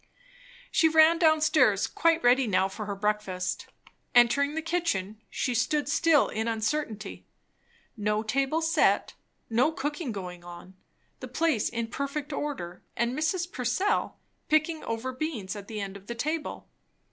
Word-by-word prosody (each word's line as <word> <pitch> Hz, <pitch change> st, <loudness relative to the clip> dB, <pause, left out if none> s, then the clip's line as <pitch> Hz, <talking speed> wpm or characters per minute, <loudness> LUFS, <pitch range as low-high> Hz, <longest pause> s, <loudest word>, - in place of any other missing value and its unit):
She 320 Hz, -, +4 dB
ran 320 Hz, +1 st, +6 dB
down 315 Hz, -2 st, +4 dB
stairs, 255 Hz, -10 st, +4 dB
quite 330 Hz, 0 st, +1 dB
ready 250 Hz, +1 st, +4 dB
now 190 Hz, -2 st, +2 dB
for 205 Hz, +2 st, -7 dB
her 200 Hz, -, -3 dB
breakfast. 195 Hz, -3 st, -2 dB, 0.5 s
Entering 280 Hz, +5 st, +4 dB
the 320 Hz, -, -2 dB
kitchen, 220 Hz, -, -2 dB
she 250 Hz, -, -1 dB
stood 285 Hz, +4 st, 0 dB
still 320 Hz, 0 st, +4 dB
in 220 Hz, +1 st, -2 dB
uncertainty. 220 Hz, -2 st, -3 dB, 0.7 s
No 210 Hz, 0 st, 0 dB
table 275 Hz, +8 st, 0 dB
set, 320 Hz, -1 st, +2 dB, 0.3 s
no 245 Hz, +7 st, +2 dB
cooking 295 Hz, -1 st, -3 dB
going 180 Hz, -4 st, -7 dB
on, 175 Hz, +2 st, -11 dB, 0.4 s
the 255 Hz, -, -7 dB
place 290 Hz, -2 st, +1 dB
in 235 Hz, 0 st, -2 dB
perfect 280 Hz, +5 st, -4 dB
order, 275 Hz, -13 st, -4 dB, 0.2 s
and 235 Hz, +1 st, 0 dB
Mrs. 340 Hz, +4 st, -1 dB
Purcell 255 Hz, -, 0 dB, 0.3 s
picking 310 Hz, 0 st, +1 dB
over 230 Hz, +3 st, -3 dB
beans 255 Hz, -, -4 dB
at 200 Hz, -1 st, -8 dB
the 215 Hz, -1 st, -5 dB
end 195 Hz, -1 st, -5 dB
of 200 Hz, 0 st, -12 dB
the 235 Hz, -, -4 dB
table. 305 Hz, +6 st, -3 dB
250 Hz, 145 wpm, -28 LUFS, 210-310 Hz, 0.7 s, ran